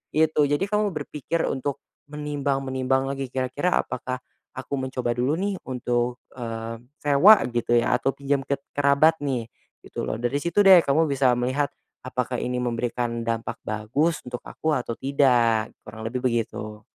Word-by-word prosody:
Gitu. 155 Hz, -2 st, +3 dB
Jadi 145 Hz, +5 st, +1 dB
kamu 210 Hz, +1 st, +1 dB
berpikir 150 Hz, +2 st, -3 dB
untuk 140 Hz, +1 st, -3 dB, 0.3 s
menimbang-menimbang 135 Hz, -3 st, -1 dB
lagi, 135 Hz, -1 st, -3 dB
kira-kira 130 Hz, +7 st, 0 dB
apakah 130 Hz, 0 st, -4 dB, 0.4 s
aku 130 Hz, +2 st, -6 dB
mencoba 130 Hz, -2 st, -2 dB
dulu 125 Hz, +6 st, 0 dB
nih, 195 Hz, 0 st, -2 dB
untuk, 120 Hz, -1 st, -1 dB, 0.2 s
eee, 115 Hz, -1 st, -5 dB, 0.2 s
sewa 145 Hz, +9 st, +8 dB, 0.2 s
gitu 120 Hz, 0 st, +1 dB
ya, 120 Hz, -, +2 dB
atau 135 Hz, -, +1 dB
pinjam 140 Hz, 0 st, 0 dB
ke 140 Hz, -, 0 dB, 0.2 s
kerabat 145 Hz, +3 st, +4 dB
nih, 130 Hz, -5 st, -1 dB, 0.4 s
gitu -, -, -5 dB
loh. -, -, -2 dB
Dari 120 Hz, +5 st, -1 dB
situ 170 Hz, +6 st, +2 dB
deh 185 Hz, -3 st, +9 dB
kamu 160 Hz, +3 st, +2 dB
bisa 135 Hz, -3 st, +2 dB
melihat 130 Hz, +4 st, 0 dB, 0.3 s
apakah 125 Hz, -1 st, -3 dB
ini 125 Hz, 0 st, -2 dB
memberikan 120 Hz, -1 st, -2 dB
dampak 115 Hz, 0 st, -2 dB
bagus 115 Hz, +10 st, -1 dB
untuk 125 Hz, -1 st, -6 dB
aku 155 Hz, -1 st, -2 dB
atau 120 Hz, -4 st, -2 dB
tidak, 125 Hz, -5 st, +3 dB, 0.2 s
kurang 110 Hz, -, -9 dB
lebih 125 Hz, +2 st, -3 dB
begitu. 110 Hz, -3 st, -2 dB
130 Hz, 150 wpm, -25 LUFS, 120-145 Hz, 0.4 s, deh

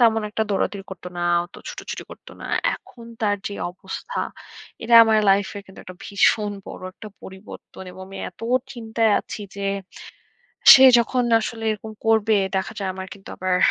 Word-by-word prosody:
তেমন 225 Hz, -2 st, +4 dB
একটা 220 Hz, -, -1 dB
দৌড়াদৌড়ি 195 Hz, 0 st, -1 dB
করতো 180 Hz, -1 st, -8 dB
না, -, -, -2 dB, 0.2 s
অত 175 Hz, -, -18 dB
ছুটোছুটি -, -, -7 dB
করতো -, -, -13 dB
না। -, -, -7 dB, 0.3 s
এখন 235 Hz, -, -14 dB, 0.2 s
তার 205 Hz, -2 st, +1 dB
যে 200 Hz, -, -7 dB, 0.2 s
অবস্থা, 190 Hz, -, -7 dB, 0.6 s
এটা 230 Hz, +1 st, +2 dB
আমার 220 Hz, -1 st, +3 dB
লাইফের 200 Hz, +1 st, +1 dB
কিন্তু 190 Hz, -, -13 dB
একটা 185 Hz, 0 st, -10 dB
ভীষণ 205 Hz, +1 st, +2 dB
বড় -, -, -9 dB
একটা 215 Hz, -, -10 dB
পরিবর্তন 190 Hz, 0 st, -11 dB
এবং 190 Hz, -, -10 dB
আমি 195 Hz, -, -10 dB
এত -, -, -24 dB, 0.3 s
চিন্তায় 225 Hz, -2 st, 0 dB
আছি -, -, -8 dB, 0.2 s
যে, 200 Hz, -, -5 dB, 1.1 s
সে 265 Hz, -, +7 dB, 0.2 s
যখন 250 Hz, +2 st, +1 dB, 0.2 s
আসলে 225 Hz, +1 st, -5 dB
এরকম 215 Hz, +1 st, -8 dB
করবে, 220 Hz, -1 st, +3 dB, 0.2 s
দেখা 190 Hz, +3 st, -2 dB
যায় 195 Hz, -2 st, -2 dB
আমার 190 Hz, 0 st, -6 dB
কিন্তু 195 Hz, -, -16 dB
আবার 185 Hz, -1 st, 0 dB
205 Hz, 165 wpm, -22 LUFS, 190-225 Hz, 1.1 s, সে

